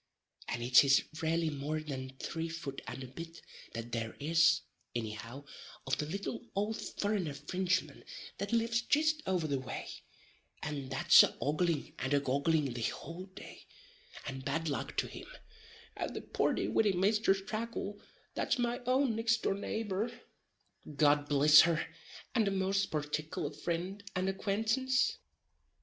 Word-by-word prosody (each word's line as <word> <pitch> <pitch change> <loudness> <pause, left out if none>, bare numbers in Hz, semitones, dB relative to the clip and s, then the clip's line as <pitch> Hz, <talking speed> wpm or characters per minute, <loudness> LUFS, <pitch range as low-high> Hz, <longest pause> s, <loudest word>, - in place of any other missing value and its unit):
And 120 0 -3
it 125 +3 +7
is 135 0 +5
ralelly 165 0 +1
more 150 +3 -2
than 130 -3 -6
three 165 +4 -3
fut 160 -5 -5
and 135 - -5
a - - -7
bit 165 +6 -9 0.3
that 115 +1 -6
there 115 -1 -3
is, 165 +2 +4 0.3
inny 110 -2 -2
how, 115 +6 -8 0.4
of 135 - 0
the 150 - -1
little 195 +5 -3 0.2
ould 210 +2 0
furrener 200 -8 -2
Frinchman 180 0 -1 0.4
that 200 +1 -3
lives 230 0 +2
jist 305 +4 +2
over 180 -4 +1
the 140 -3 0
way, 130 -1 -6 0.7
and 145 -3 -4
that's 130 0 +7
a - - +1
oggling 155 +1 0
and 130 +3 +1
a - - +4
goggling 140 +1 +1
the 120 - -5
houl 170 - -4
day, - - -11 0.6
(and 135 -1 -5
bad 160 +4 -1
luck 140 - -3
to - - +2
him,) - - -9 0.7
at - - -4
the - - -3
purty - - 0
widdy 210 -3 +3
Misthress 195 +1 +3
Tracle 215 -2 -4 0.3
that's - - 0
my 240 0 0
own 255 -2 +3
nixt 230 +1 +1
door - - +2
neighbor, 210 +2 -2 0.8
(God 145 0 +3
bliss 150 +1 +8
her!) 165 -1 +2 0.5
and 225 -4 +3
a - - +2
most 195 +1 +1
particuller 150 0 -3
frind 180 +4 -3
and 185 +1 0
acquaintance? 225 - +1
165 Hz, 150 wpm, -33 LUFS, 140-205 Hz, 0.8 s, bliss